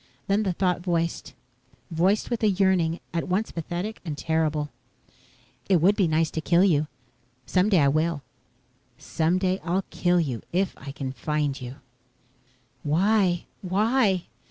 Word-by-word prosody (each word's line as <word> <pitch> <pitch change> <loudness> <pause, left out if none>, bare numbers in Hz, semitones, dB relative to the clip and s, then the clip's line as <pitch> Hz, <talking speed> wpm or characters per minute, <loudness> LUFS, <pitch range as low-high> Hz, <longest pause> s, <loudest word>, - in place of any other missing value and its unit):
Then 200 +2 +2
the 190 -4 0
thought 180 0 0
voiced 170 -2 -2 0.6
voiced 185 +8 +1
with 235 - -1
a 215 - +4
yearning 185 -4 +2
at 170 +2 -2
once 190 +4 0
pathetic 175 +6 -4
and 155 -5 -5
terrible: 155 -2 0 1.0
"It 185 -3 +5
would 190 +6 +4
be 195 -4 +2
nice 160 0 +1
to 160 - -3
kill 170 +3 +3
you. 155 -6 +3 0.6
Someday 185 +6 +3
I 145 -3 +4
will. 155 +1 0 0.7
Someday 185 +3 0
I'll 185 +3 -1
kill 175 0 +2
you 130 -9 -2
if 190 +2 0
I 140 - -8
can 135 -1 -5
find 145 +2 -2
you." 125 +1 -7 1.1
"Why? 180 +3 +2 0.2
Why?" 200 0 +2
175 Hz, 140 wpm, -25 LUFS, 155-190 Hz, 1.1 s, It